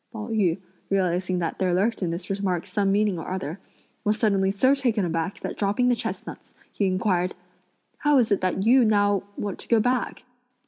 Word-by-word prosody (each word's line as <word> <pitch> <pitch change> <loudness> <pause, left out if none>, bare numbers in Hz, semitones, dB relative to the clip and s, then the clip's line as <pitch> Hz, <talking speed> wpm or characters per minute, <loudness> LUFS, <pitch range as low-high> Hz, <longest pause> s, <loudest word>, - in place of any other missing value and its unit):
Pao 220 0 -6
yü, 200 -6 +1 0.3
realising 185 -1 0
that 170 -2 -3
there 185 -2 +1
lurked 215 +5 0
in 180 - 0
this 175 +3 -4
remark 190 -3 -1
some 200 -1 0
meaning 205 -3 +1
or 160 - -6
other, 185 -1 -4 0.4
was 210 +1 +1
suddenly 195 -4 +2
so 255 +8 +3
taken 240 -8 +1
aback 165 +3 -3
that - - -4
dropping 210 +5 +1
the 245 - +3
chestnuts, - - -7 0.2
he 200 - 0
inquired: 185 -1 0 0.6
"How 295 -1 +3
is 235 -4 +2
it 200 - +2
that 185 +1 0
you 250 +2 +6
now 205 -3 +3 0.2
want 200 -2 -4
to - - -8
go 230 - +4
back?" 245 +2 -1
200 Hz, 190 wpm, -25 LUFS, 185-220 Hz, 0.6 s, you